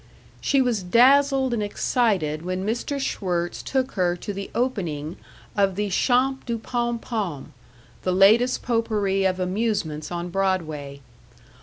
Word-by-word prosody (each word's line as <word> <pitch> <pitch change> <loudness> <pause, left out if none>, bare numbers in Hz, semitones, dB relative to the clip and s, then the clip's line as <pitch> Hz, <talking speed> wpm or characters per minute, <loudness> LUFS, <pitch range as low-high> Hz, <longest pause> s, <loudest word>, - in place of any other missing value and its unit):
She 275 -2 +2
was 240 -5 0
dazzled 265 +6 +4
and 230 - -1
excited 205 - 0
when 185 +2 -3
Mr. 240 +6 -2
Schwirtz 175 -9 -2
took 265 -1 -1
her 180 -3 +1
to 205 +3 -6
the 195 0 -6
opening 175 - -2 0.4
of 195 -2 +2
the 205 0 -2
Champs 265 +6 +2
du 235 -1 -1
Pom 240 +1 -2
Pom, 205 - -4 0.5
the 185 - -1
latest 215 +7 +4
potpourri 210 -5 0
of 185 -1 +1
amusements 185 -6 -2
on 175 0 -4
Broadway. 160 -7 -2
200 Hz, 135 wpm, -24 LUFS, 180-240 Hz, 0.5 s, dazzled